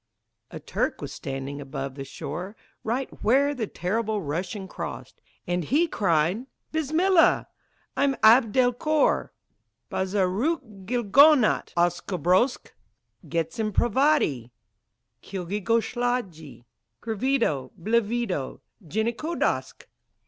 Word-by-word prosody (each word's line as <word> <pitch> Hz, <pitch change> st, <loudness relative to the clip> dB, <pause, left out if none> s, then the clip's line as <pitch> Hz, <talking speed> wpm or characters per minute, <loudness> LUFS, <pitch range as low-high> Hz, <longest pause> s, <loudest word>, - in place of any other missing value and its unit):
A -, -, -8 dB
Turk -, -, -2 dB
was -, -, -6 dB
standing 135 Hz, +1 st, -5 dB
upon 135 Hz, -1 st, -5 dB
the 135 Hz, 0 st, -7 dB
shore 175 Hz, +9 st, -6 dB, 0.3 s
Right 250 Hz, +4 st, -1 dB, 0.2 s
where 275 Hz, +6 st, +3 dB
the 235 Hz, -6 st, -3 dB
terrible 215 Hz, +4 st, -2 dB
Russian 185 Hz, +5 st, -4 dB
crossed; -, -, -7 dB, 0.2 s
And 175 Hz, 0 st, -1 dB
he 300 Hz, -, +3 dB
cried, 185 Hz, -, +1 dB, 0.2 s
"Bismillah! 320 Hz, +4 st, +3 dB, 0.5 s
I'm 275 Hz, -1 st, +2 dB
Abd 225 Hz, +1 st, +6 dB
el 250 Hz, -1 st, +4 dB
Kor 305 Hz, +4 st, +1 dB, 0.6 s
Bazaroukilgonautoskobrosk 205 Hz, -, +2 dB, 0.6 s
Getzinpravadi 210 Hz, -, +1 dB, 0.7 s
Kilgekosladji 200 Hz, -, -2 dB, 0.3 s
Grivido 225 Hz, -, 0 dB
Blivido 220 Hz, -, -1 dB, 0.2 s
Jenikodosk!" 230 Hz, -, -2 dB
215 Hz, 80 wpm, -25 LUFS, 175-250 Hz, 0.7 s, Abd